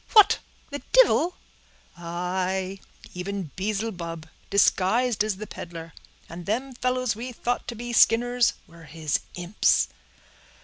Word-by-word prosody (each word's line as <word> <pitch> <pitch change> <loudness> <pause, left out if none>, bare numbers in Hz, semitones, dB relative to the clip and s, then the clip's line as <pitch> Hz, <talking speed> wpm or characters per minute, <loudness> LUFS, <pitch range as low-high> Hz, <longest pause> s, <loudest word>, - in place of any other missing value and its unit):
"What, 425 -3 +7 0.3
the 285 - -4
divil?" 425 -8 +5 0.6
"Aye, 185 +2 -2 0.3
even 180 -3 -4
Beelzebub, 185 -5 -3 0.2
disguised 210 +4 +3
as 215 -2 -1
the 210 +3 -6
peddler; 165 -4 -8 0.3
and 170 +1 -9
them 255 +6 -1
fellows 255 -2 0
we 245 +4 -5
thought 245 +1 -2
to 240 - -4
be 240 +1 -5
Skinners 245 +1 +4
were 170 -1 -15
his 155 0 -1 0.2
imps." 175 - +2
200 Hz, 120 wpm, -26 LUFS, 175-240 Hz, 0.6 s, What